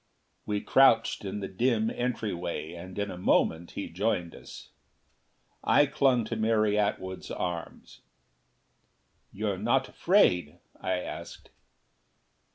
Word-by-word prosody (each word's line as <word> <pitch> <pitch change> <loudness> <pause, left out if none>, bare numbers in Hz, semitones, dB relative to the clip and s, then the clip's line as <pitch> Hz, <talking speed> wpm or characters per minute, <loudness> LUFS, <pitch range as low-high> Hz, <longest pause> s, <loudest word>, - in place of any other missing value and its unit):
We 105 -1 -1
crouched 115 -6 +4
in 100 +1 -4
the 95 - -3
dim 115 +2 +1
entryway 100 -10 -3
and 90 +2 -9
in 100 -1 -2
a 90 - -8
moment 85 -2 +1
he - - -3
joined 90 -2 -1
us. - - -12 0.9
I 145 +2 +5
clung 135 -5 +2
to 115 - -4
Mary 110 -1 +2
Atwood's 95 -3 -2
arm. 85 -2 -4 1.5
"You're - - -2
not - - +1
afraid?" 85 -2 +2 0.2
I 95 - -1
asked. 90 - -8
105 Hz, 115 wpm, -28 LUFS, 90-115 Hz, 1.5 s, I